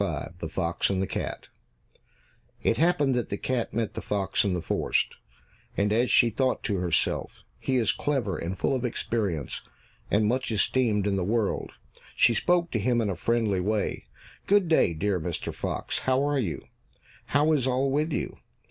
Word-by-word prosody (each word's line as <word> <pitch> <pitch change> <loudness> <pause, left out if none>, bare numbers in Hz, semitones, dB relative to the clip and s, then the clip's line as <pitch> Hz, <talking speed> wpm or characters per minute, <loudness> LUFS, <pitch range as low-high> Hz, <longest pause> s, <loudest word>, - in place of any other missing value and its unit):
75 85 - -3
The 80 - -4
Fox 85 +1 0
and 95 -2 0
the 95 - +1
Cat - - -5 1.1
It 115 - +2
happened 150 -5 +3
that 125 -2 -1
the 100 - -2
cat 125 0 -1
met 115 -1 -2
the - - -5
fox 100 -2 0
in 100 -3 0
a 90 - -2
forest, - - 0 0.6
and 105 +1 +2
as 120 +3 +2
she 120 -2 +5
thought 130 +3 0
to 100 - 0
herself, 90 -2 -1 0.2
"He 130 - -1
is 115 -4 +3
clever 130 -10 -1
and 85 +5 -4
full - - +1
of 130 -2 -1
experience, 100 - -2 0.5
and 105 +1 +3
much 125 +4 0
esteemed 110 -1 +2
in 100 -1 +1
the 95 - 0
world," 105 +2 -1 0.4
she 120 - +5
spoke 175 +7 +2
to 115 - 0
him 120 +3 +2
in 105 -3 0
a - - -3
friendly 110 0 +1
way. 105 +2 -1 0.4
"Good 200 -2 +4
day, 160 - +3
dear 95 +3 0
Mr. 85 0 -4
Fox, - - -3
how 130 +1 +1
are 145 -1 +1
you? 100 -10 -2 0.6
How 145 +3 +2
is 135 -4 +1
all 130 +1 +1
with 150 +4 +1
you? - - -3
115 Hz, 185 wpm, -27 LUFS, 95-130 Hz, 1.1 s, she